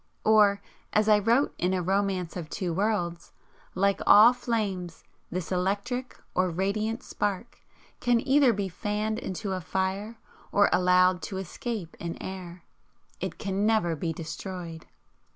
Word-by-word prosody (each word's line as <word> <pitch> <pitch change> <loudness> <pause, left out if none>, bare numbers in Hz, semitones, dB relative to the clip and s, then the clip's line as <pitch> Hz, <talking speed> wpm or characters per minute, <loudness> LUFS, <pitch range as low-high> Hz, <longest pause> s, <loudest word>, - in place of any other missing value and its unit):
Or, 205 -2 +5 0.3
as 215 0 +3
I 210 -1 +6
wrote 235 +7 +2
in 180 +2 +1
"A 185 - 0
Romance 190 -2 0
of 170 -4 -6
Two 175 -1 -3
Worlds 175 -3 -1 0.2
" - - -30
"Like 200 +1 +2
all 220 +4 +9
flames, 200 -8 -3 0.3
this 180 0 -4
electric 200 +8 -2 0.2
(or 185 0 +2
radiant) 215 +7 -1
spark 205 +3 -3 0.4
can 245 -1 +3
either 270 -1 +5
be 200 -3 -2
fanned 210 +4 -2
into 195 +2 -4
a 185 - -3
fire, 190 +5 -2 0.3
or 205 0 +4
allowed 180 0 +4
to 190 - -5
escape 195 - -5
in 170 -1 -5
air, 180 -2 -7 0.6
IT - - -4
CAN 200 +1 -1
NEVER 215 -7 +2
BE 165 +2 -2
DESTROYED." 165 +1 -7
195 Hz, 145 wpm, -27 LUFS, 180-215 Hz, 0.6 s, all